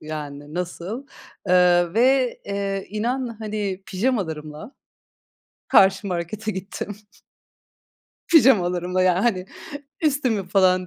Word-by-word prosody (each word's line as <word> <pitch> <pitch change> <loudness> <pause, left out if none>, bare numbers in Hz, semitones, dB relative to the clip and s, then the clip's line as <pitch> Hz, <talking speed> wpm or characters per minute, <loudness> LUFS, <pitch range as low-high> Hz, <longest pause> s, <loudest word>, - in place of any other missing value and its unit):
Yani 150 -1 -7
nasıl? 180 +8 -5 0.4
Eee, 175 -1 +4
ve, 255 +2 +3
eee, 200 -1 -3
inan, 235 +3 -2
hani, 210 -3 -4
pijamalarımla 185 - -3 1.0
karşı 190 +1 +5
markete 185 +4 -3
gittim. 195 +1 -6 1.3
Pijamalarımla, 185 - +4
yani, 185 -1 +3
hani, 190 -6 0 0.6
üstümü 255 - 0
falan 185 -1 +3
195 Hz, 90 wpm, -23 LUFS, 180-225 Hz, 1.3 s, karşı